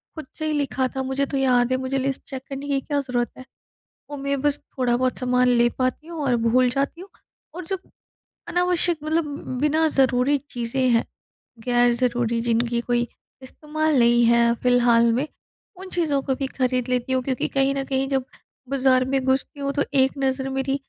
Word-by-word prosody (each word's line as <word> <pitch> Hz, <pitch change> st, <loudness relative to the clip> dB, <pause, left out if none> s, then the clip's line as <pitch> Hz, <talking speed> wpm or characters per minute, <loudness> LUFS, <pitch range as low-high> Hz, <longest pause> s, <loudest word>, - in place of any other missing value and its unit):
खुद 315 Hz, -, -7 dB
से 310 Hz, -, -3 dB
ही 310 Hz, -, 0 dB
लिखा 270 Hz, -2 st, 0 dB
था 265 Hz, -, -1 dB
मुझे 265 Hz, +1 st, -1 dB
तो 275 Hz, 0 st, -3 dB
याद 250 Hz, -2 st, +2 dB
है। 255 Hz, -, +2 dB
मुझे 260 Hz, +1 st, -2 dB
लिस्ट 270 Hz, 0 st, -2 dB
चेक 265 Hz, -2 st, -5 dB
करने 275 Hz, +1 st, -6 dB
की 280 Hz, -1 st, +1 dB
क्या 290 Hz, 0 st, -1 dB
ज़रूरत 245 Hz, -3 st, -2 dB
है? 255 Hz, -, -10 dB, 0.7 s
और 290 Hz, -, -6 dB
मैं 280 Hz, 0 st, -2 dB
बस 290 Hz, -1 st, +2 dB
थोड़ा-बहुत 255 Hz, -1 st, -1 dB
सामान 250 Hz, 0 st, +2 dB
ले 240 Hz, -1 st, +4 dB
पाती 255 Hz, +5 st, -1 dB
हूँ 335 Hz, -2 st, -7 dB
और 250 Hz, -3 st, +2 dB
भूल 250 Hz, +2 st, +3 dB
जाती 275 Hz, +6 st, -2 dB
हूँ 385 Hz, +2 st, -11 dB, 0.4 s
और 360 Hz, +1 st, -6 dB
जब 380 Hz, +1 st, -5 dB, 0.6 s
अनावश्यक 355 Hz, -1 st, +1 dB
मतलब 315 Hz, +1 st, 0 dB, 0.4 s
बिना 315 Hz, +2 st, +3 dB
ज़रूरी 265 Hz, +1 st, +3 dB
चीज़ें 245 Hz, +2 st, -1 dB
हैं, 230 Hz, -1 st, +3 dB, 0.6 s
ग़ैर-ज़रूरी 240 Hz, -1 st, +2 dB
जिनकी 235 Hz, 0 st, 0 dB
कोई 240 Hz, 0 st, 0 dB, 0.4 s
इस्तेमाल 305 Hz, +2 st, -1 dB
नहीं 240 Hz, 0 st, +4 dB
है 235 Hz, 0 st, +4 dB
फिलहाल 240 Hz, -2 st, +4 dB
में, 260 Hz, +6 st, 0 dB, 0.5 s
उन 380 Hz, +1 st, -9 dB
चीज़ों 305 Hz, -5 st, 0 dB
को 265 Hz, -, -1 dB
भी 270 Hz, 0 st, -3 dB
खरीद 255 Hz, -2 st, -1 dB
लेती 250 Hz, +1 st, -1 dB
हूँ 255 Hz, -, +1 dB
क्योंकि 255 Hz, -1 st, -2 dB
कहीं 275 Hz, 0 st, +1 dB
न 275 Hz, -1 st, -2 dB
कहीं 270 Hz, 0 st, -1 dB
जब 270 Hz, -2 st, 0 dB, 0.5 s
बाज़ार 260 Hz, -2 st, +3 dB
में 270 Hz, 0 st, +1 dB
घुसती 265 Hz, +2 st, 0 dB
हूँ 280 Hz, 0 st, -1 dB
तो 285 Hz, -, +1 dB
एक 265 Hz, -1 st, +4 dB
नज़र 265 Hz, 0 st, -1 dB
मेरी 270 Hz, 0 st, -1 dB
265 Hz, 185 wpm, -23 LUFS, 245-280 Hz, 0.7 s, ले